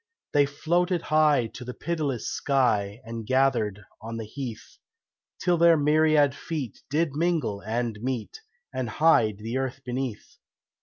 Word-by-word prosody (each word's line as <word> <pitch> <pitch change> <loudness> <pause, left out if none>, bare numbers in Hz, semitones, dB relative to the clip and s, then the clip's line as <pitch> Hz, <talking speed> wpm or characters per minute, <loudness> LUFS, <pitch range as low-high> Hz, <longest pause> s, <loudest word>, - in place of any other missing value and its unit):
They 145 -1 +4
floated 175 +5 0
high 155 -5 +3
to - - -8
the 125 0 -7
pitiless 150 -8 -2
sky 115 -6 +1
And 115 0 -6
gathered 130 -6 +2 0.2
on 115 +1 -6
the 110 - -5
heath, 115 0 -8 0.6
Till 175 -2 +1
their 170 -1 +6
myriad 150 -1 +4
feet 145 -6 -5
did 155 +1 +1
mingle 155 -11 0
and 115 0 -2
meet, 130 - -4 0.3
And 130 -3 -2
hide 110 -6 +3
the 115 +5 -3
earth 130 0 -3
beneath. 125 -3 -4
135 Hz, 140 wpm, -26 LUFS, 115-155 Hz, 0.6 s, their